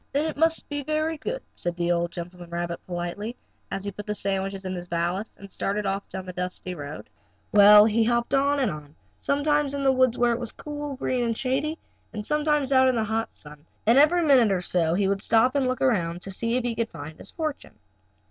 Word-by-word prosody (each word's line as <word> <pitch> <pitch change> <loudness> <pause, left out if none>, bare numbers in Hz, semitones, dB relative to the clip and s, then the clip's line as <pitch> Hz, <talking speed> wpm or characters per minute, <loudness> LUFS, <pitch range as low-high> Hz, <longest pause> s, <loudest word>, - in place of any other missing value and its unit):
"Then 285 +3 +1
it 315 - -3
must 325 +2 +1
be 290 -1 -3
very 310 +3 -1
good," - - -4
said 175 0 -3
the 175 0 +1
old 170 0 0
gentleman 175 0 -8
rabbit 170 0 -4
politely, 180 +6 -4 0.3
as 195 - -4
he 200 - -2
put 210 +2 -9
the 210 - -1
sandwiches 195 -1 -2
in 185 - -3
his 180 -1 -6
valise 175 +5 -2
and 200 -1 -12
started 205 +1 -2
off 195 +1 -2
down 190 -1 -6
the 185 - -7
dusty 180 0 -4
road. 145 -2 -8 0.4
Well, 210 0 +9
he 225 +1 +3
hopped 235 +3 0
on 280 +1 +3
and 255 -6 +1
on, 150 -1 -10 0.2
sometimes 290 0 +1
in 280 - -2
the 270 - +5
woods 255 -2 +2
where 240 -1 +3
it 235 - -3
was 235 -3 -5
cool 295 0 -6
and 275 - -6
green 255 -1 -1
and 230 -1 -1
shady, 285 +5 -1 0.4
and 210 -1 -5
sometimes 300 -1 +1
out 260 0 +6
in 255 - +2
the 225 - +1
hot 220 +1 -2
sun, 150 0 -13 0.2
and 235 +5 +6
every 340 +4 +5
minute 260 -8 +5
or 190 - +1
so 170 -2 0
he 195 +1 +2
would 195 0 0
stop 230 +4 +3
and 275 -2 +1
look 255 0 -2
around 175 -9 +1
to 195 - -6
see 230 +5 0
if 255 - -1
he 240 -1 -1
could 225 0 -2
find 155 +2 -9
his - - -9
fortune. 310 -3 -5
220 Hz, 235 wpm, -25 LUFS, 180-275 Hz, 0.4 s, Well